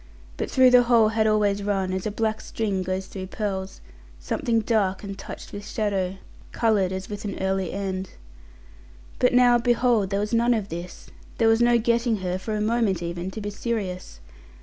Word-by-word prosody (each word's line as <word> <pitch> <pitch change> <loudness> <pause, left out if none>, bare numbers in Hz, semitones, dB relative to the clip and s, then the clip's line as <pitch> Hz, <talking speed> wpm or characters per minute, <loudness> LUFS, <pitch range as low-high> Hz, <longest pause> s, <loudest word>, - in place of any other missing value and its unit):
But - - -3
through 260 -1 +5
the 250 0 +8
whole 235 -3 +4
had 220 0 +1
always 205 -2 +2
run, 195 -2 -1
as 190 +2 -2
a - - 0
black 220 +1 -1
string 205 -4 -2
goes 185 +1 -3
through 190 -1 -7
pearls, 195 -2 -4 0.4
something 225 - 0
dark 210 -4 0
and 195 -1 -6
touched 195 - -9
with 205 - -6
shadow, 195 -3 -1 0.3
coloured 210 -5 +1
as 190 0 -4
with 205 -1 -6
an 200 -2 -4
early 190 -1 -1
end. 190 -1 -3 1.1
But, 250 - +4
now, 245 -1 +5
behold! 240 -4 +2
there 200 0 0
was 210 +2 -3
none 235 +1 +3
of 210 -3 -3
this! 170 +2 -8 0.3
There 225 - +3
was 225 +1 +3
no 240 0 +5
getting 235 0 +1
her, 180 +1 -1
for 215 +3 -4
a 210 - -1
moment, 215 -5 +1
even 175 +2 -4
to 215 +3 -7
be 205 0 -4
serious. 195 - -4
205 Hz, 190 wpm, -24 LUFS, 190-230 Hz, 1.1 s, the